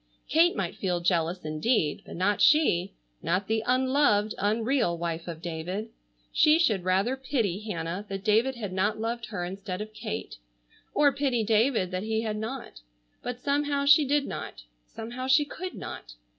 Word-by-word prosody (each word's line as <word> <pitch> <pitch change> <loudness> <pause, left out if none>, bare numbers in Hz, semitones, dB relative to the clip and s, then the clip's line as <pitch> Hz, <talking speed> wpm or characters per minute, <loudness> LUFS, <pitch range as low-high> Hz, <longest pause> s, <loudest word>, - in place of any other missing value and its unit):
Kate 335 +3 +4
might 190 -4 -2
feel 180 -3 -1
jealous, 170 0 0
indeed, 155 - 0
but - - -8
not 200 +4 +1
she, 245 - +4 0.3
not 185 +3 0
the 220 +2 0
unloved, 255 -4 +3
unreal, 220 -2 +1
wife 165 0 -4
of 165 -1 -7
David. 175 +6 -4 0.4
She 305 +1 +5
should 220 - +2
rather 190 +7 +1
pity 240 -8 -1
Hannah 180 -3 -4
that 195 -1 -5
David 225 +5 +3
had 205 -6 -5
not 205 +3 0
loved 230 +1 -3
her 180 -5 -4
instead 190 0 -5
of 215 +1 -6
Kate, 220 0 -5 0.6
or 290 -1 +5
pity 265 -4 0
David 220 -3 +2
that 185 0 -2
he 220 +1 -1
had 215 -2 -2
not. 220 - -6 0.4
But 245 0 -5
somehow 285 0 0
she 290 +2 +7
did 285 0 +1
not, - - -7 0.2
somehow 240 +3 -6
she 290 +3 +5
could 365 +5 -7
not. - - -8
215 Hz, 165 wpm, -27 LUFS, 185-260 Hz, 0.6 s, she